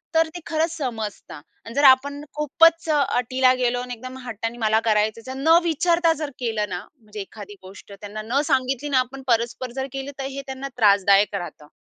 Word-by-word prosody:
तर 325 0 +4
ते - - -5
खरंच 320 +1 0
समजतात 220 - -5 0.2
अन् 230 - -8
जर 285 - +2
आपण 285 +2 +5
खूपच 325 +3 +3
अटीला 260 -3 +2
गेलो 245 0 +1
अन् 250 - -7
एकदम 255 +2 -7
हट्टाने 230 0 -5
मला 220 -1 +2
करायचं 215 +1 +1
जर 260 - -6
न 320 +4 +5
विचारता 335 0 +2
जर 290 - -3
केलं 220 -4 -2
ना 180 -1 -3 0.2
म्हणजे 215 -1 -10
एखादी 205 +1 -10
गोष्ट 190 +2 -13
त्यांना 205 +1 -8
न 255 +5 +1
सांगितली 270 +2 0
ना 265 -2 +3
आपण 255 +2 -4
परस्पर 235 +1 0
जर 265 0 -3
केलं 270 +1 -5
तर 270 - -3
हे 275 +1 -6
त्यांना 265 +1 -5
त्रासदायक 200 -2 +4
राहतं. 175 -5 -7
255 Hz, 190 wpm, -23 LUFS, 215-275 Hz, 0.2 s, आपण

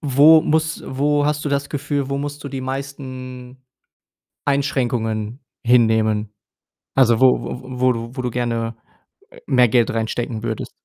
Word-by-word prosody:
wo 150 +2 +6
muss 160 +1 0
wo 145 +2 +1
hast 150 0 -1
du - - 0
das 140 0 -1
Gefühl, 145 -1 -2
wo 140 - -1
musst 145 +1 -5
du - - -4
die 135 -1 -5
meisten 130 -1 -7 0.9
Einschränkungen 120 -5 -1 0.3
hinnehmen? 110 -3 +3 0.6
Also 120 -3 +4
wo 130 -1 +6 0.2
wo 130 -1 -8
wo 130 0 +4
du 115 +3 -6
wo 130 - -2
du 125 - -2
gerne, 115 -1 -2 0.6
äh, - - -16
mehr 125 -2 +5
Geld 120 0 +2
reinstecken 115 0 -3
würdest? 110 -2 -4
130 Hz, 150 wpm, -20 LUFS, 115-140 Hz, 0.9 s, wo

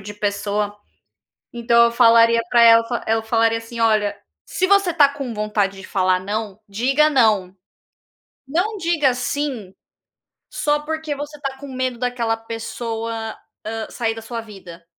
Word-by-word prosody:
de 205 +1 -9
pessoa. 205 0 -2 0.8
Então, 235 0 +4
eu 235 - 0
falaria 230 -1 +5
para 235 -1 +5
ela 230 0 +7
eu 235 +1 -3
f 220 - -1
eu - - -4
falaria, 225 0 +1
assim: 230 +1 -8
"Olha, 215 -2 +2 0.3
se 370 - -1
você 395 -2 +3
está 300 -4 +5
com 275 -4 -6
vontade 210 -2 -1
de 185 - -10
falar 185 -1 +1
"não", 205 +1 -4
diga 270 +9 +2
"não". 215 -9 +2 0.9
Não 365 +9 -1
diga 330 -7 +1
"sim", 250 -5 -3 0.8
só 295 0 0
porque 315 0 -4
você 290 +1 -7
está 275 -2 -5
com 280 0 -9
medo 255 -1 -2
daquela 240 -2 -1
pessoa, 225 0 -5 0.3
hã, 225 0 -4
sair 225 -2 -2
da 225 - -9
sua 230 +1 -5
vida". 185 -6 -12
230 Hz, 155 wpm, -20 LUFS, 215-270 Hz, 0.9 s, ela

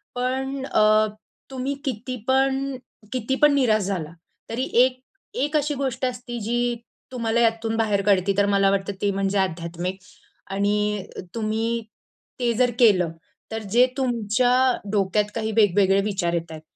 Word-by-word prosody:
पण 265 +2 -2
अ, 215 -2 +4 0.4
तुम्ही 265 +1 -2
कितीपण 265 +3 -1 0.4
कितीपण 265 +4 +2
निराश 230 -6 +3
झाला 175 -5 -3 0.4
तरी 235 +3 -2 0.2
एक 255 0 +2 0.4
एक 295 +1 -2
अशी 295 0 0
गोष्ट 265 -2 -2
असते 245 -1 -4
जी 240 +2 0 0.4
तुम्हाला 235 -2 0
यातून 225 -1 +1
बाहेर 210 -3 +1
काढते, 195 -1 +3
तर 200 - +4
मला 195 0 +4
वाटतं 200 0 -1
ते 205 -1 +2
म्हणजे 195 +1 -1
आध्यात्मिक 175 +1 -3 0.5
आणि 205 0 0 0.3
तुम्ही 225 +1 -1 0.6
ते 240 -1 +1
जर 245 +1 +2
केलं, 185 -8 +4 0.4
तर 220 0 -4
जे 245 +2 +6
तुमच्या 245 -1 +1 0.4
डोक्यात 205 0 +1
काही 220 -1 -2
वेगवेगळे 200 -2 +4
विचार 195 -4 -1
येतायेत 165 -2 -4
225 Hz, 130 wpm, -23 LUFS, 200-250 Hz, 0.6 s, जे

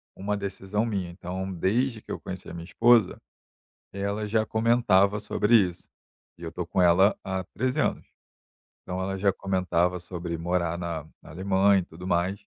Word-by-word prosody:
uma 105 +2 -2
decisão 100 +2 -2
minha. 95 -6 -2
Então, 95 +2 -5
desde 110 +7 0
que - - -10
eu - - -4
conheci 95 -1 -7
a - - -8
minha 85 0 -7
esposa, 115 +2 +4 0.7
ela 100 +2 -2
já 110 +1 +1
comentava 105 -3 +3
sobre 105 +2 0
isso 90 -5 +1 0.5
e 85 - -13
eu 80 - -5
tô 90 - -4
com 90 - 0
ela 90 +4 +5
há 95 -1 -3
13, 130 +2 0
anos. - - -1 0.8
Então, 90 0 -5
ela 95 0 -3
já 100 +1 +3
comentava 90 -2 0
sobre 85 -2 -5
morar 85 0 -1
na 85 -3 -4 0.2
na - - -15
Alemanha 95 +3 +3
e - - -6
tudo 90 +3 -11
mais, 90 +2 0
95 Hz, 170 wpm, -26 LUFS, 90-105 Hz, 0.8 s, ela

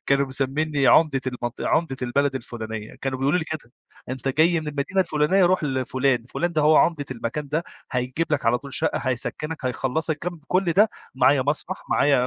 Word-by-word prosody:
كانوا 140 0 +3
مسمييني 140 +2 0
عمدة 135 +1 +5
المنطق 120 -1 -4
عمدة 160 -5 +1
البلد 140 +3 +1
الفلانية. 110 -3 -6
كانوا 130 -1 -2
بيقولوا 140 +7 +2
لي 160 - -2
كده: 150 -7 -6 0.4
"أنت 130 +1 -3
جاي 160 +4 +3
من 155 - -5
المدينة 150 +6 -1
الفلانية؟ 170 +2 +2
روح 180 -3 +2
لفلان. 130 -2 0
فلان 170 +7 -2
ده 155 -2 +1
هو 155 +1 +5
عمدة 160 -4 +3
المكان 130 +4 -4
ده 160 +4 0 0.3
هيجيب 125 +6 -1
لك 140 -5 0
على 120 +1 +3
طول 140 0 -6
شقة، 160 - +1
هيسكنك، 135 +4 -3
هيخلصك." 140 +5 -1
كم 175 0 -5
كل 185 +2 +2
ده 210 +4 +4 0.2
معايا 130 +1 +4
مسرح 145 +3 -2
معايا 140 -3 +3
140 Hz, 180 wpm, -24 LUFS, 130-155 Hz, 0.4 s, عمدة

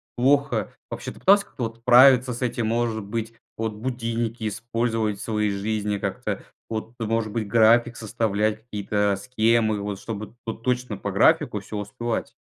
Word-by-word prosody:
плохо. 130 -2 +2 0.2
Вообще 120 +2 -5
ты - - -14
пытался 200 +1 +5
как-то 125 - -7
вот 115 0 -4
справиться 125 +1 +6
с 120 - -8
этим? 120 -2 -1
Может 115 -2 0
быть, 115 +2 -4 0.2
вот 110 -1 -2
будильники 115 -1 -3
использовать 115 -1 -1
в - - -6
своей 105 -2 0
жизни 105 +1 -1
как-то? - - -3 0.3
Вот, 110 +1 -4
может 115 -1 -1
быть, 110 -2 -2
график 115 +2 +4
составлять, 110 0 -1
какие-то 105 0 0
э, - - -2
схемы 110 -1 +1
вот, 100 -1 -4
чтобы 110 +1 -6
то 115 - -2
точно 125 -2 -2
по 100 - -4
графику 120 - +3
всё 105 +1 -7
успевать. 110 +3 -3
115 Hz, 165 wpm, -24 LUFS, 105-120 Hz, 0.3 s, справиться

